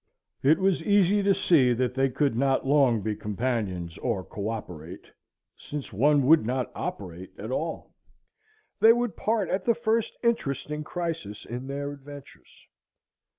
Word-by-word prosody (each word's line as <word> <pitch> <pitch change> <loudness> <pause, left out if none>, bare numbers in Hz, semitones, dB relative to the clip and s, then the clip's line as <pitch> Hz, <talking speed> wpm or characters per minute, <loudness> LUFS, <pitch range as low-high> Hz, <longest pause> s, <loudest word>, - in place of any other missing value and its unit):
It 145 +4 +5
was 190 -3 +1
easy 200 +1 +3
to 200 -1 +3
see 145 -9 +4
that 125 0 -1
they 135 +1 +2
could 135 -1 0
not 135 +2 +1
long 135 -5 +3
be 110 -1 -1
companions 105 -7 -3
or 105 -7 -2
coöperate, 95 -6 -6 0.5
since 145 -6 -7
one 140 +6 +3
would 160 0 +6
not 125 +2 -2
operate 90 -1 -6
at 110 +4 -6
all. 160 +5 -4 0.9
They 225 +1 +8
would 240 -2 -1
part 215 -3 0
at 190 0 -1
the 235 - +3
first 230 -1 0
interesting 150 - -1
crisis 165 - -5
in 125 +3 -6
their 140 +1 -4
adventures. 145 0 -13
140 Hz, 145 wpm, -27 LUFS, 115-170 Hz, 0.9 s, They